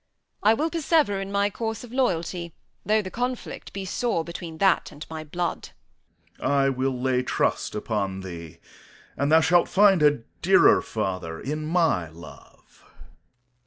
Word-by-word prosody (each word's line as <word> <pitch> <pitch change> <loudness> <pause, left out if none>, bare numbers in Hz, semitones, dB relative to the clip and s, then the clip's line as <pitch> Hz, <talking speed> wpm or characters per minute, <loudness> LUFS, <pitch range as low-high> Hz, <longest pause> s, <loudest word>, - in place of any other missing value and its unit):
I 215 +2 +5
will 315 +7 -1
persever 305 - +1
in 195 0 -6
my 200 0 +1
course 225 0 -4
of 240 -1 -11
loyalty, 175 -8 -1 0.3
though 215 0 +2
the 185 - -7
conflict 250 +1 -4
be 195 -1 -5
sore 190 -2 -1
between 170 -1 -8
that 195 +3 +2
and 150 +2 -9
my 160 -1 -5
blood. 175 +3 -3 0.7
Corn. - - -1
I 140 -1 +3
will 130 -1 -1
lay 125 0 +1
trust 130 - -1
upon 100 -3 -2
thee, 85 -3 -9 0.6
and 140 +2 0
thou 160 +1 +7
shalt 175 +2 +3
find 195 -3 +5
a 145 -5 +3 0.2
dearer - - +5
father 90 -4 -4
in 155 +2 -4
my 160 - +1
love. 85 +1 -15
165 Hz, 155 wpm, -25 LUFS, 130-200 Hz, 0.7 s, thou